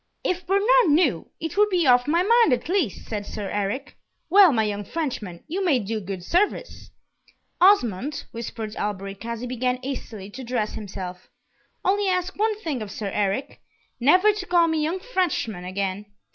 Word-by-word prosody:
"If 360 -1 -2
Bernard 395 +2 +2 0.2
knew, 290 - +2
it 325 -1 -4
would 420 0 +5
be 360 -4 +2
off 250 0 +5
my 335 +4 +3
mind, 460 - +5
at 250 - -2
least!" 345 - -1
said 210 -2 -3
Sir 205 0 -6
Eric. 205 +7 -3 0.4
"Well, 390 -3 +8
my 225 -4 +2
young 205 -1 -2
Frenchman, 210 - -4
you 370 +5 -2
may 320 -8 +3
do 220 -1 -3
good 190 -2 -6
service." 400 - -1 0.7
"Osmond," 285 - +3
whispered 225 -1 -6
Alberic, 195 0 -4
as 235 -1 -4
he - - -4
began 250 0 -1
hastily 220 -7 -6
to 260 +5 -8
dress 235 -3 -2
himself, 185 -3 -7 0.6
"only 400 +1 +2
ask 365 0 0
one 430 0 0
thing 290 - -3
of 210 - -5
Sir 200 -1 -5
Eric 205 +5 -2 0.4
never 365 - +5
to 405 -3 -5
call 345 -1 +4
me 320 -1 0
young 325 +5 -1
Frenchman 355 - -2
again!" 195 +2 -3
255 Hz, 170 wpm, -24 LUFS, -, 0.7 s, Well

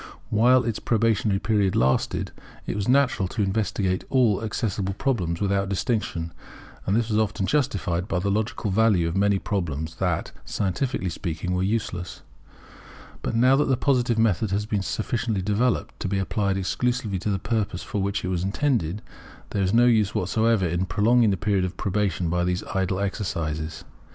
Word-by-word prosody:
While 125 +4 +5
its 115 -3 -2
probationary 110 -3 +1
period 100 -2 +1
lasted, 65 +1 +1 0.3
it - - -3
was 100 -1 -2
natural 130 -7 +3
to 105 +3 -1
investigate 95 -2 0
all 115 -6 +3
accessible 100 -3 -2
problems 95 -11 -1
without 100 -1 0
distinction; 95 -6 -2 0.5
and 100 - +2
this 115 0 +1
was 105 0 +2
often 105 -2 0
justified 100 - 0
by 95 - -1
the 100 +3 0
logical 105 0 -1
value 100 -4 +3
of 85 - -3
many 100 0 +3
problems 80 -5 -3
that, - - -1
scientifically 100 0 -2
speaking, 85 +1 -3
were 90 - 0
useless. 95 -3 -2 1.0
But - - -2
now 125 +3 +5
that 150 - +3
the 130 -2 +1
Positive 125 -4 +1
method 110 -2 +2
has 100 +2 -1
been 105 -2 -1
sufficiently 110 0 -2
developed 110 +5 0
to - - -2
be 100 +1 -1
applied 100 0 0
exclusively 110 +1 -1
to 105 - -2
the 100 - +1
purpose 100 -3 -2
for 105 - -3
which 100 0 -1
it - - -2
was 90 -2 -1
intended, 105 - 0 0.5
there 100 - -1
is 95 -1 +1
no 120 +2 +5
use 110 -4 +3
whatever 110 -3 +2
in 85 +3 -1
prolonging 110 +5 +3
the 95 - +1
period 100 -1 +1
of 90 0 -4
probation 95 -3 0
by 90 +2 0
these 90 0 -1
idle 95 0 0
exercises. 80 -6 -3
100 Hz, 170 wpm, -25 LUFS, 95-115 Hz, 1.0 s, While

